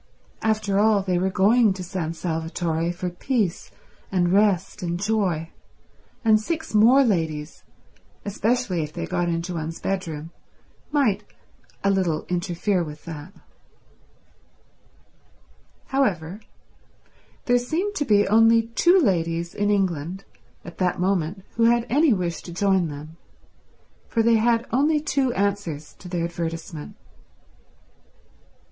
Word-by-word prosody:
After 215 -2 +1
all, 210 -2 +4
they 180 -2 0
were 190 +1 +1
going 210 +3 +4
to 185 -1 -7
San 175 -3 -3
Salvatore 165 0 -2
for 180 0 -4
peace 205 0 -1 0.4
and 180 -2 +2
rest 200 -3 +2
and 175 -1 -2
joy, 190 -6 0 0.7
and 215 -1 +5
six 320 +5 -4
more 235 +6 +6
ladies, 160 - -2 0.6
especially 210 -2 0
if 150 -1 -4
they 85 - -4
got 175 - -1
into 170 +2 -2
one's 165 0 -4
bedroom, 165 -5 -4 0.6
might 225 -9 +2 0.6
a 200 - +3
little 180 -5 0
interfere 180 +1 0
with 150 -1 -9
that. 160 +1 -8 2.6
However, 200 -9 0 1.1
there 245 0 +3
seemed 335 +12 -2
to - - +1
be 205 -3 +4
only 225 +2 +4
two 350 +10 +4
ladies 170 - 0
in 205 0 0
England 185 -2 -1 0.4
at 175 - -11
that 180 -2 0
moment 185 0 0
who 230 - +4
had 235 0 +3
any 295 +3 +4
wish 180 -5 -1
to 175 - -10
join 190 0 +2
them, 150 +2 -9 0.9
for 230 - +1
they 230 0 +4
had 230 +1 +2
only 295 +5 +3
two 275 -3 0
answers 195 -7 -2
to 180 - -10
their 175 -1 -1
advertisement. 165 -1 -5
190 Hz, 125 wpm, -24 LUFS, 170-220 Hz, 2.6 s, more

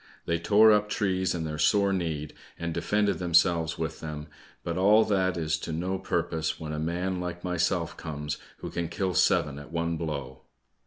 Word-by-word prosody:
They 85 0 0
tore 105 +5 +6
up 105 0 +3
trees 95 -3 0
in 85 - -2
their 75 -1 -4
sore 100 +6 +3
need, 80 -5 -2 0.2
and 85 -1 -3
defended 100 +4 +1
themselves 85 -2 +3
with 80 0 -3
them, 75 -1 -6 0.3
but 85 -1 -3
all 105 +4 +5
that 95 -3 +1
is 80 -1 0
to 80 - -5
no 90 +4 -2
purpose 80 -3 -1
when 75 -1 -5
a 75 - -3
man 90 +3 -1
like 90 0 -5
myself 90 -1 0
comes, 75 -2 -5 0.2
who - - -5
can 85 -1 -3
kill 95 0 -1
seven 75 -5 +2
at 75 +2 -12
one 85 0 -1
blow." 75 -5 -5
85 Hz, 180 wpm, -28 LUFS, 80-95 Hz, 0.3 s, tore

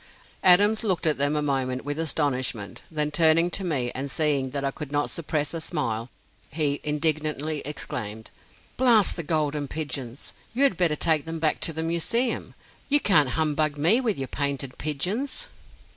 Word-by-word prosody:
Adams 205 +5 +6
looked 185 -7 0
at 155 -3 +2
them 145 +2 +2
a 150 - 0
moment 130 -2 -1
with 145 +2 -3
astonishment; 130 -9 -1
then 150 -2 -1
turning 165 +2 +4
to 195 - 0
me, 135 -9 -1
and 135 +2 -4
seeing 140 -2 0
that 140 +1 -3
I 135 - 0
could 145 0 -8
not 145 0 0
suppress 150 -2 -2
a 165 - -4
smile, 115 -9 -2 0.4
he 145 -1 -1
indignantly 150 0 -1
exclaimed: 110 -7 -4 0.5
"Blast 235 -5 +4
the 170 - -3
Golden 150 -2 -1
Pigeons! 135 -4 -5 0.2
You 270 - +2
had 275 -9 +4
better 170 -3 +2
take 155 -1 +1
them 165 0 -4
back 155 -1 0
to - - +1
the 160 0 -3
Museum. 200 +9 0 0.3
You 290 +1 +4
can't 150 - +4
humbug 155 -1 +1
me 175 - +4
with 225 -6 0
your 135 -1 -3
painted 140 -2 -3
pigeons!" 205 - -2
150 Hz, 170 wpm, -25 LUFS, 140-165 Hz, 0.5 s, Adams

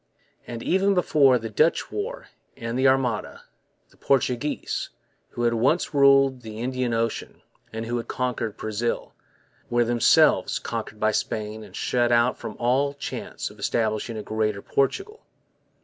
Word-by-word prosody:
And, 115 -1 -6
even 195 +2 +2
before 145 -7 +4
the 115 -1 -6
Dutch 155 +10 +2
War 485 +5 -5 0.3
and 115 0 -4
the 130 +1 +3
Armada, 130 -5 0 0.5
the - - -24
Portuguese, 135 +1 -1 0.4
who 120 - -4
had 120 0 +3
once 135 +11 +1
ruled 135 -2 +5
the 110 -2 -9
Indian 130 0 -1
Ocean 115 0 -3 0.3
and 115 +1 -5
who 120 +1 -2
had 115 - -5
conquered 125 -4 -2
Brazil, 110 +2 -3 0.6
were 120 0 +2
themselves 120 -1 +4
conquered 105 - -5
by 110 0 +2
Spain 110 0 -3
and - - -13
shut 120 -1 +1
out 120 +1 +3
from - - -6
all 135 +4 +1
chance 140 - -5
of - - -17
establishing 110 0 -1
a 105 - -5
Greater 105 -2 -1
Portugal. 400 - -1
120 Hz, 150 wpm, -25 LUFS, 115-135 Hz, 0.6 s, ruled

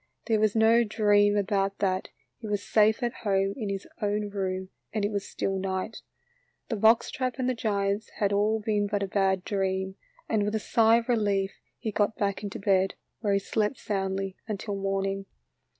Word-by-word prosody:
There 220 -2 +2
was 215 0 +2
no 225 +1 +5
dream 205 -1 +3
about 195 -1 0
that, 185 -2 0 0.3
he 225 - -7
was 205 -1 -1
safe 220 +3 +3
at 240 0 0
home 195 -2 +1
in 215 -5 -4
his 195 -1 -4
own 210 0 0
room 190 -2 -3 0.2
and 215 -2 0
it 205 - -1
was 200 -1 -3
still 195 -1 -2
night. 190 +3 -3 0.7
The 230 - 0
box 220 +2 +4
trap 255 -2 -2
and 255 -1 -1
the 255 - +2
giants 205 -2 -1
had 205 -1 +1
all 210 +2 +2
been 210 -2 0
a 200 -1 +1
bad 190 -1 +1
dream, 190 -1 -1 0.3
and 220 -2 +1
with 210 +1 0
a - - +1
sigh 225 +1 +4
of 235 0 0
relief 205 -5 +1 0.3
he 225 -3 -3
got 205 +1 0
back 200 -1 -1
into 205 -2 -5
bed, 195 -1 +2 0.2
where 205 -3 +1
he - - +4
slept 210 +4 -1
soundly 195 -1 -2
until 205 -1 -3
morning. 195 0 -2
205 Hz, 185 wpm, -28 LUFS, 195-220 Hz, 0.7 s, no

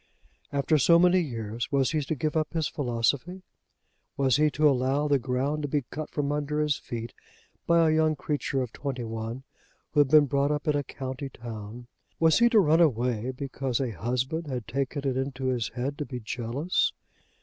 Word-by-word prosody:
After 140 +2 +2
so 170 +5 +6
many 180 +1 +5
years, 115 -7 -4
was 135 -2 +2
he 155 -1 0
to 150 +3 -2
give 155 +3 -2
up 155 0 0
his 160 -3 0
philosophy? 140 +7 -1 0.7
Was 135 -2 +3
he 150 0 +4
to 150 +1 +3
allow 135 +2 +2
the 140 -2 +3
ground 130 +4 -1
to 145 - -2
be 145 0 0
cut 155 +1 -5
from 145 -1 -2
under 150 0 -1
his 150 -2 +2
feet 115 -3 -6 0.5
by 170 -1 +5
a 155 - +3
young 155 0 +3
creature 140 -3 -2
of 120 - -8
twenty 135 -4 -4
one 115 +3 -5 0.5
who 150 - +1
had 145 - +6
been 150 0 +7
brought 140 +1 +1
up 150 +2 -2
in 150 - +3
a 145 - 0
county 135 0 -6
town? 115 -1 -8 0.3
Was 160 +3 +4
he 235 0 +6
to 225 -3 +5
run 165 -2 +4
away 125 -5 +1
because 130 -1 -3
a 130 -3 -1
husband 125 - -2
had 125 -5 -4
taken 140 +3 -2
it 130 - 0
into 130 -1 -2
his 120 -3 0
head 135 +3 -3
to 150 - -2
be 125 -2 -5
jealous? 125 - -1
140 Hz, 195 wpm, -27 LUFS, 125-150 Hz, 0.7 s, been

